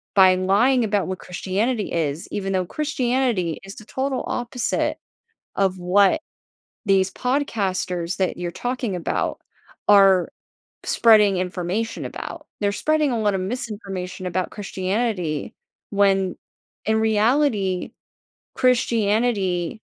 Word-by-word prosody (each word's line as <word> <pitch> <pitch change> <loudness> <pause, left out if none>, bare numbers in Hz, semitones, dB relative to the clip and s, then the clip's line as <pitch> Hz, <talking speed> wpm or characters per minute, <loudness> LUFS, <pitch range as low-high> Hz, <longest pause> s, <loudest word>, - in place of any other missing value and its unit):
by 190 -1 +7
lying 210 +8 +3
about 205 -4 0
what 185 0 -4
Christianity 205 +5 -2
is, 155 -2 -1
even 195 -1 -2
though 185 -1 +1
Christianity 250 - 0
is 195 - -9
the 215 - -11
total 265 +3 -2
opposite 245 0 -1 0.6
of 190 -1 +1
what 190 - +3 0.6
these 195 -1 +3
podcasters 190 -10 -1
that 190 -1 0
you're 175 -1 -3
talking 245 0 -3
about 175 - -2 0.5
are 195 -2 +6 0.6
spreading 210 -4 +5
information 180 +4 -2
about. - - -7
They're 205 -1 +1
spreading 305 +4 +1
a 230 - 0
lot 205 -2 +1
of 190 - -1
misinformation 195 -4 -5
about 180 0 -1
Christianity 190 -5 -2 0.4
when 195 -2 +2 0.5
in 220 +1 +2
reality, 220 -3 +1 0.6
Christianity 220 -6 +1
200 Hz, 110 wpm, -23 LUFS, 185-235 Hz, 0.6 s, by